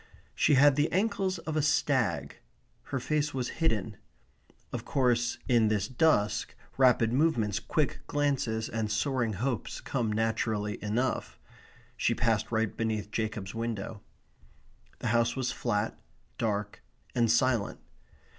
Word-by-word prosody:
She 145 Hz, -, +3 dB
had 140 Hz, +1 st, +6 dB
the 150 Hz, +2 st, +2 dB
ankles 190 Hz, -1 st, 0 dB
of 160 Hz, -2 st, -5 dB
a 155 Hz, -, +2 dB
stag. 125 Hz, -, +1 dB, 0.5 s
Her 135 Hz, -, -3 dB
face 150 Hz, +2 st, -1 dB
was 125 Hz, -2 st, -1 dB
hidden. 110 Hz, -, 0 dB, 0.8 s
Of -, -, -3 dB
course, 120 Hz, -3 st, +1 dB
in 120 Hz, -4 st, +4 dB
this 105 Hz, -2 st, +1 dB
dusk, 130 Hz, -6 st, +1 dB, 0.2 s
rapid 125 Hz, -3 st, +4 dB
movements, 120 Hz, -8 st, +2 dB
quick 150 Hz, +4 st, -1 dB
glances, 135 Hz, -7 st, 0 dB
and 110 Hz, -2 st, -2 dB
soaring 120 Hz, +1 st, 0 dB
hopes 120 Hz, +4 st, -2 dB
come 120 Hz, -5 st, -2 dB
naturally 110 Hz, -1 st, -1 dB
enough. 120 Hz, +5 st, -1 dB, 0.6 s
She -, -, +1 dB
passed 115 Hz, -2 st, 0 dB
right 110 Hz, -2 st, 0 dB
beneath 110 Hz, -2 st, -2 dB
Jacob's 110 Hz, -4 st, -3 dB
window. 115 Hz, -2 st, -4 dB, 1.0 s
The -, -, -2 dB
house 115 Hz, +1 st, +2 dB
was 130 Hz, -2 st, -1 dB
flat, 110 Hz, -2 st, -1 dB, 0.4 s
dark, 105 Hz, -2 st, -2 dB, 0.3 s
and 115 Hz, -2 st, +2 dB
silent. 120 Hz, -3 st, +1 dB
115 Hz, 125 wpm, -29 LUFS, 110-135 Hz, 1.0 s, had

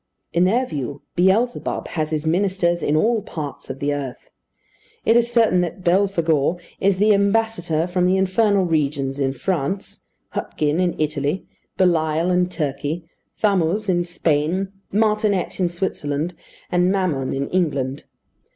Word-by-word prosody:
In 175 Hz, +1 st, +4 dB
their 235 Hz, +7 st, +2 dB
view, 145 Hz, -, -5 dB
Beelzebub 195 Hz, +7 st, +1 dB
has 155 Hz, -2 st, -2 dB
his 155 Hz, 0 st, -2 dB
ministers 175 Hz, 0 st, +1 dB
in 150 Hz, -, +1 dB
all 220 Hz, +7 st, +2 dB
parts 150 Hz, -9 st, -7 dB
of 130 Hz, -, -4 dB
the 145 Hz, +1 st, -1 dB
earth. 140 Hz, -3 st, -6 dB, 0.7 s
It 225 Hz, -, +4 dB
is 235 Hz, 0 st, +3 dB
certain 225 Hz, -6 st, +4 dB
that 175 Hz, +2 st, -4 dB
Belphegor 170 Hz, -4 st, +2 dB, 0.2 s
is 195 Hz, -1 st, +2 dB
the 210 Hz, +2 st, +5 dB
ambassador 200 Hz, -5 st, +1 dB
from 180 Hz, 0 st, +1 dB
the 185 Hz, +1 st, +3 dB
infernal 195 Hz, +1 st, +2 dB
regions 140 Hz, -4 st, 0 dB
in 135 Hz, -1 st, +1 dB
France, 175 Hz, +5 st, -3 dB, 0.3 s
Hutgin 150 Hz, +2 st, -1 dB
in 180 Hz, -1 st, 0 dB
Italy, 150 Hz, +2 st, -1 dB, 0.3 s
Belial 165 Hz, -1 st, +2 dB
in 180 Hz, 0 st, +2 dB
Turkey, 155 Hz, 0 st, -3 dB, 0.3 s
Thamuz 200 Hz, 0 st, +1 dB
in 175 Hz, -1 st, +2 dB
Spain, 175 Hz, +2 st, 0 dB, 0.2 s
Martinet 210 Hz, -3 st, +1 dB
in 180 Hz, -2 st, +2 dB
Switzerland, 170 Hz, -3 st, -2 dB, 0.4 s
and 180 Hz, +1 st, +3 dB
Mammon 170 Hz, -9 st, 0 dB
in 135 Hz, +1 st, -2 dB
England. 145 Hz, -7 st, -1 dB
175 Hz, 140 wpm, -21 LUFS, 150-195 Hz, 0.7 s, the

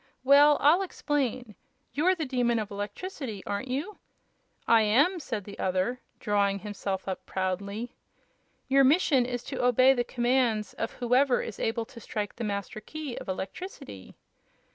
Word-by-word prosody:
Well, 285 Hz, +2 st, +7 dB
I'll 315 Hz, +6 st, +5 dB
explain. 265 Hz, -, -2 dB, 0.4 s
You're 355 Hz, +6 st, +3 dB
the 320 Hz, -3 st, -3 dB
Demon 245 Hz, -3 st, +1 dB
of 215 Hz, -2 st, -3 dB
Electricity, 210 Hz, -, -5 dB
aren't 205 Hz, +5 st, -3 dB
you?" 290 Hz, +11 st, -4 dB, 0.7 s
"I 230 Hz, -1 st, +6 dB
am," 280 Hz, -, +3 dB
said 225 Hz, -, -4 dB
the 200 Hz, +1 st, -11 dB
other, 190 Hz, +7 st, 0 dB, 0.2 s
drawing 200 Hz, -1 st, +1 dB
himself 200 Hz, -2 st, -4 dB
up 190 Hz, -, -4 dB
proudly. 200 Hz, +5 st, -3 dB, 0.7 s
"Your 275 Hz, +1 st, +5 dB
mission 270 Hz, -3 st, +4 dB
is 245 Hz, -1 st, -4 dB
to -, -, -4 dB
obey 255 Hz, +2 st, +5 dB
the 245 Hz, -2 st, 0 dB
commands 240 Hz, -4 st, 0 dB
of -, -, -4 dB
whoever 250 Hz, +1 st, +2 dB
is 220 Hz, -, -7 dB
able 225 Hz, 0 st, -1 dB
to 230 Hz, -, -13 dB
strike 210 Hz, -2 st, -4 dB
the 235 Hz, -, -4 dB
Master 200 Hz, 0 st, -3 dB
Key 295 Hz, +2 st, -6 dB
of -, -, -9 dB
Electricity." 190 Hz, -, -7 dB
240 Hz, 150 wpm, -28 LUFS, 205-275 Hz, 0.7 s, Well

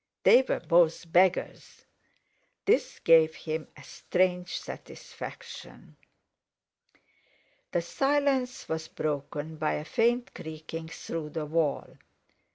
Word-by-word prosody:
They 255 Hz, -, +8 dB
were 260 Hz, -, -1 dB
both 170 Hz, 0 st, +3 dB
beggars. 185 Hz, +1 st, +1 dB, 0.8 s
This 440 Hz, +5 st, +2 dB
gave 160 Hz, -1 st, +5 dB
him 155 Hz, 0 st, -4 dB
a 145 Hz, -, -12 dB
strange 180 Hz, +3 st, -1 dB
satisfaction. -, -, -10 dB, 1.8 s
The 175 Hz, -, 0 dB
silence 270 Hz, +3 st, 0 dB
was 160 Hz, 0 st, -3 dB
broken 150 Hz, +1 st, -4 dB
by 155 Hz, 0 st, 0 dB
a 150 Hz, -, -3 dB
faint 240 Hz, +6 st, +1 dB
creaking 160 Hz, +1 st, -7 dB
through 160 Hz, -1 st, -5 dB
the 155 Hz, 0 st, -4 dB
wall. 155 Hz, -1 st, -1 dB
165 Hz, 100 wpm, -28 LUFS, 155-185 Hz, 1.8 s, They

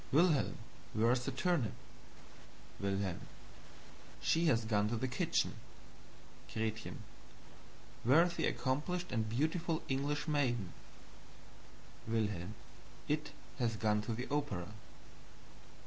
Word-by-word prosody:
Wilhelm, 155 Hz, -1 st, +4 dB, 0.4 s
where 115 Hz, +2 st, +4 dB
is 125 Hz, 0 st, +1 dB
the -, -, 0 dB
turnip? 140 Hz, -, +1 dB, 1.1 s
"Wilhelm. 100 Hz, -2 st, -1 dB, 1.0 s
She 165 Hz, +1 st, +3 dB
has 115 Hz, -8 st, +3 dB
gone 105 Hz, -1 st, +2 dB
to 120 Hz, -, 0 dB
the 125 Hz, +3 st, 0 dB
kitchen. 125 Hz, -, +1 dB, 1.0 s
"Gretchen. 110 Hz, 0 st, -3 dB, 1.0 s
Where 140 Hz, +8 st, +7 dB
is 175 Hz, -1 st, 0 dB
the -, -, +1 dB
accomplished 175 Hz, +7 st, -1 dB
and 110 Hz, -3 st, 0 dB
beautiful 160 Hz, +6 st, 0 dB
English 145 Hz, +3 st, 0 dB
maiden? 120 Hz, -, +1 dB, 1.3 s
"Wilhelm. 105 Hz, -4 st, -1 dB, 0.5 s
It -, -, 0 dB, 0.3 s
has 115 Hz, -2 st, +1 dB
gone 105 Hz, -1 st, +2 dB
to 110 Hz, +1 st, -2 dB
the 125 Hz, +3 st, -4 dB
opera." 115 Hz, -12 st, -1 dB
120 Hz, 105 wpm, -36 LUFS, 110-145 Hz, 1.3 s, Where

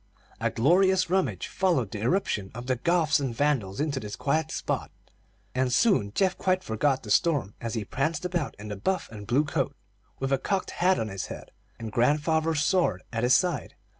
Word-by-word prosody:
A -, -, +1 dB
glorious 185 Hz, +7 st, +3 dB
rummage 190 Hz, 0 st, 0 dB
followed 165 Hz, -, 0 dB
the 105 Hz, -, -5 dB
irruption 115 Hz, -, 0 dB
of 120 Hz, +1 st, -6 dB
the 130 Hz, 0 st, +1 dB
Goths 160 Hz, +2 st, +2 dB
and 130 Hz, -4 st, -3 dB
Vandals 125 Hz, -9 st, 0 dB
into 145 Hz, -2 st, 0 dB
this 105 Hz, -4 st, -6 dB
quiet 155 Hz, +2 st, 0 dB
spot, -, -, -2 dB, 0.6 s
and 130 Hz, 0 st, +1 dB
soon 150 Hz, -, +3 dB
Geoff 190 Hz, -1 st, +2 dB
quite 185 Hz, 0 st, +1 dB
forgot 130 Hz, +5 st, 0 dB
the 105 Hz, -, -6 dB
storm 125 Hz, -, +2 dB
as 115 Hz, 0 st, -3 dB
he 110 Hz, -2 st, -2 dB
pranced 155 Hz, -, -1 dB
about 175 Hz, -5 st, -2 dB
in 105 Hz, +1 st, -8 dB
the 105 Hz, -, -4 dB
buff 185 Hz, -, -1 dB
and 105 Hz, -2 st, -9 dB
blue 130 Hz, +5 st, +3 dB
coat, 145 Hz, -, -2 dB, 0.4 s
with 135 Hz, 0 st, -1 dB
a 135 Hz, -, +2 dB
cocked 190 Hz, +7 st, -1 dB
hat 185 Hz, +1 st, +2 dB
on 110 Hz, -, -2 dB
his 95 Hz, -1 st, -5 dB
head, -, -, -9 dB, 0.3 s
and 115 Hz, -2 st, -6 dB
grandfather's 150 Hz, +5 st, +2 dB
sword 160 Hz, -, +1 dB
at 115 Hz, -, -1 dB
his 125 Hz, +2 st, +5 dB
side. 175 Hz, -8 st, 0 dB
140 Hz, 195 wpm, -27 LUFS, 115-175 Hz, 0.6 s, his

